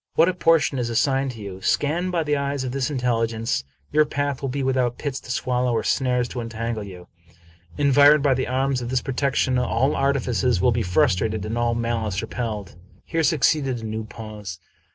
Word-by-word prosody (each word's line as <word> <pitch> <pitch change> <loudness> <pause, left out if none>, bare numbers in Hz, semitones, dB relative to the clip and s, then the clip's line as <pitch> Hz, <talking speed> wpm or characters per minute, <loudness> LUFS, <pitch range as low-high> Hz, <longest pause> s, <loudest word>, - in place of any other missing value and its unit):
What 165 - +5
a - - 0
portion 165 -6 +2
is 120 -1 -1
assigned 135 +3 +1
to 115 - -11
you! 95 -1 -8
Scanned 170 - 0
by 170 -2 0
the 150 -1 0
eyes 140 -1 -2
of 130 - -3
this 135 +1 -1
intelligence, 115 - -1 0.3
your 155 - +5
path 145 -2 -2
will 135 - -2
be 135 +2 -2
without 130 -2 0
pits 140 -3 -3
to - - -15
swallow 125 0 0
or 110 -1 0
snares 125 0 +1
to 125 - -4
entangle 115 -1 -4
you. 90 -3 -10 0.7
Environed 145 +1 +5
by 140 -2 +4
the 130 - -1
arms 130 0 0
of 120 - -4
this 130 -1 0
protection, 135 -1 0
all 125 +3 +1
artifices 130 -5 +1
will 110 +7 +3
be 115 +1 0
frustrated 110 0 +1
and 110 +2 -3
all 120 0 +1
malice 115 -4 -1
repelled." 110 -3 -4 0.3
Here 165 0 -1
succeeded 145 -5 +2
a - - -6
new 110 0 -3
pause. 105 -5 -8
125 Hz, 195 wpm, -23 LUFS, 115-140 Hz, 0.7 s, What